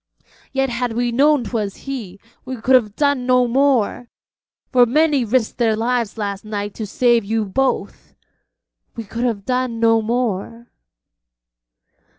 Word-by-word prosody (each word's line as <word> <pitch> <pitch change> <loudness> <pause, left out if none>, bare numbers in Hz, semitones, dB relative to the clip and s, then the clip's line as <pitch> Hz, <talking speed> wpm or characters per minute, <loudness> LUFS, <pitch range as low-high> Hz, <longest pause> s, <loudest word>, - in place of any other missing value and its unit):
Yet 270 -1 0
had 240 0 -2
we 240 +1 0
known 285 +2 +3
'twas 210 -3 -3
he, 225 -9 -6 0.2
we 260 - -5
could 255 +4 +1
have 215 -5 +3
done 285 -4 +1
no 250 -1 +4
more, 250 -2 +1 0.6
for 245 -2 +5
many 295 +1 +2
risked 235 +1 -1
their 225 -2 +2
lives 235 -1 -1
last 200 -2 -4
night 205 -1 -4
to 220 - -6
save 240 +1 +2
you 220 +1 -1
both. 260 +7 -2 0.8
We 230 - -5
could 230 +4 -4
have 210 -5 -2
done 250 -2 -1
no 225 0 +4
more.' 230 0 -3
235 Hz, 145 wpm, -20 LUFS, 220-255 Hz, 0.8 s, for